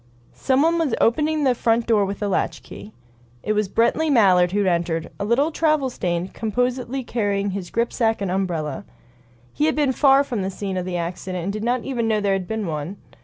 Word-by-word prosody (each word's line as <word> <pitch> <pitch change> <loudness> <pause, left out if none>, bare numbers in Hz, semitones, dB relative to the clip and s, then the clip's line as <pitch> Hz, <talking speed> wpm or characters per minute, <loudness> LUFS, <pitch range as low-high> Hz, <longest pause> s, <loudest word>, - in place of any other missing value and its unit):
Someone 315 +6 +2
was 305 -8 +1
opening 300 +5 +2
the 260 -2 +4
front 230 -1 +1
door 215 -3 +3
with 200 +2 -5
a - - 0
latchkey. 200 +2 -3 0.5
It 215 - 0
was 210 -2 0
Brently 270 +9 +1
Mallard 185 -8 +4
who 205 +1 +1
entered, 170 -2 -1
a 200 - -2
little 270 +9 +2
travel 305 -5 +1
stained, 175 -3 -3
composedly 250 +3 -2
carrying 205 -4 -1
his 190 -2 -5
grip 235 +1 -1
sack 225 -1 +1
and 195 -3 -2
umbrella. 170 -7 -2 0.7
He 300 - +1
had - - +1
been 290 -3 +2
far 275 +1 +5
from 245 -7 -3
the 190 - -2
scene 195 0 -5
of 180 -1 -2
the 180 -1 -3
accident, 175 +1 -4
and 195 +3 -2
did 215 0 -4
not 245 +1 0
even 240 -4 -2
know 215 -1 +2
there 200 -1 +1
had 190 -2 -2
been 220 -1 -3
one. 160 +3 -4
215 Hz, 205 wpm, -22 LUFS, 185-255 Hz, 0.7 s, far